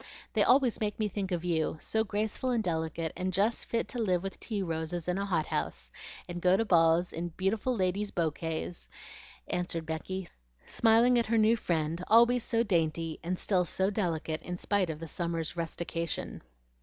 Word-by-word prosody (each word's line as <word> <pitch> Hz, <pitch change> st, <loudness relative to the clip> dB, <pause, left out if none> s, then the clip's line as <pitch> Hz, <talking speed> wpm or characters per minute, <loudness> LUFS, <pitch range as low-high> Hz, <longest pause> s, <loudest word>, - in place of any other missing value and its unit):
They -, -, +3 dB
always 255 Hz, -2 st, +4 dB
make 210 Hz, 0 st, -1 dB
me 215 Hz, -, +1 dB
think 195 Hz, -1 st, -4 dB
of 175 Hz, -1 st, -2 dB
you, 160 Hz, -2 st, 0 dB
so 220 Hz, +6 st, 0 dB
graceful 215 Hz, +4 st, -2 dB
and 235 Hz, -3 st, +1 dB
delicate, 160 Hz, -2 st, -2 dB
and 185 Hz, +1 st, -2 dB
just 205 Hz, +6 st, +1 dB
fit 230 Hz, -, 0 dB
to 245 Hz, -, -2 dB
live 185 Hz, -5 st, +1 dB
with 195 Hz, -, -5 dB
tea 210 Hz, -4 st, -3 dB
roses 165 Hz, 0 st, -3 dB
in 180 Hz, +2 st, 0 dB
a 200 Hz, -, -2 dB
hot 165 Hz, -5 st, +1 dB
house, -, -, -3 dB, 0.4 s
and 175 Hz, 0 st, -5 dB
go 185 Hz, +1 st, +4 dB
to 225 Hz, -, +1 dB
balls 170 Hz, -2 st, +4 dB
in 170 Hz, +1 st, -3 dB
beautiful 205 Hz, +8 st, -1 dB
ladies' 195 Hz, +1 st, 0 dB
bokays," 165 Hz, 0 st, -3 dB, 0.6 s
answered 175 Hz, -2 st, -2 dB
Becky, 170 Hz, +4 st, -4 dB, 0.4 s
smiling 235 Hz, +2 st, +4 dB
at 235 Hz, -, 0 dB
her 230 Hz, +1 st, +2 dB
new 220 Hz, +1 st, +5 dB
friend, 165 Hz, -4 st, -1 dB
always 235 Hz, +2 st, +6 dB
so 230 Hz, +1 st, +1 dB
dainty, 165 Hz, -5 st, 0 dB
and 180 Hz, +2 st, -2 dB
still 185 Hz, -2 st, +2 dB
so 190 Hz, +3 st, 0 dB
delicate 165 Hz, -6 st, -1 dB
in 180 Hz, 0 st, -5 dB
spite 195 Hz, -1 st, 0 dB
of 155 Hz, -, -3 dB
the 165 Hz, -, -6 dB
summer's 170 Hz, 0 st, -3 dB
rustication. 170 Hz, 0 st, -3 dB
180 Hz, 180 wpm, -30 LUFS, 165-215 Hz, 0.6 s, always